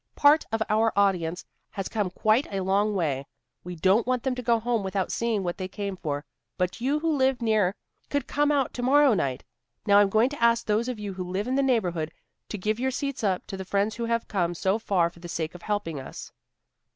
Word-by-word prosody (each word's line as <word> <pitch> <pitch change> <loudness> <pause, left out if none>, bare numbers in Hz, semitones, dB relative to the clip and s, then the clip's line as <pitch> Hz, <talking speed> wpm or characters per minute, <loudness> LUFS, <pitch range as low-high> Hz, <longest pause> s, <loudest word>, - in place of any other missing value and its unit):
Part 295 +2 +5
of 225 0 +1
our 220 +1 +2
audience 180 -4 +1 0.2
has 195 -1 -4
come 210 -4 -1
quite 215 +7 +2
a 195 -1 -2
long 200 +2 +1
way. 140 -7 -1 0.4
We 180 0 -6
don't 195 +7 +3
want 255 -2 0
them 265 - 0
to 250 - -4
go 235 -1 +2
home 235 0 0
without 190 -1 -2
seeing 230 -4 0
what 175 -1 -3
they 185 - -3
came 200 0 -4
for. 145 -5 -4 0.3
But 180 +5 -2
you 280 +5 +1
who 325 -2 +1
live 265 -2 +2
near 215 -5 +2 0.3
could 285 0 -1
come 295 0 +1
out 280 -3 +1
to 245 - -4
morrow 275 +1 +5
night. 135 -10 -1 0.4
Now 205 -1 +6
I'm 205 -1 +4
going 220 +5 +3
to 290 - -8
ask 235 0 +4
those 220 +2 +1
of 250 -2 -3
you 205 -2 -5
who 185 0 -4
live 195 +4 -2
in 255 - -1
the 275 - +3
neighborhood 180 - 0 0.4
to 210 - -4
give 215 +4 -1
your 260 +1 +1
seats 275 -1 -3
up 190 -3 0
to - - -6
the 190 - -5
friends 200 +3 0
who 235 - -2
have 230 0 -1
come 175 -3 -1
so 190 +5 0
far 180 -6 +1
for 170 - -18
the 175 0 -9
sake 160 -1 -3
of 180 - -11
helping 205 -8 -2
us." 130 - -9
210 Hz, 235 wpm, -26 LUFS, 185-240 Hz, 0.4 s, Now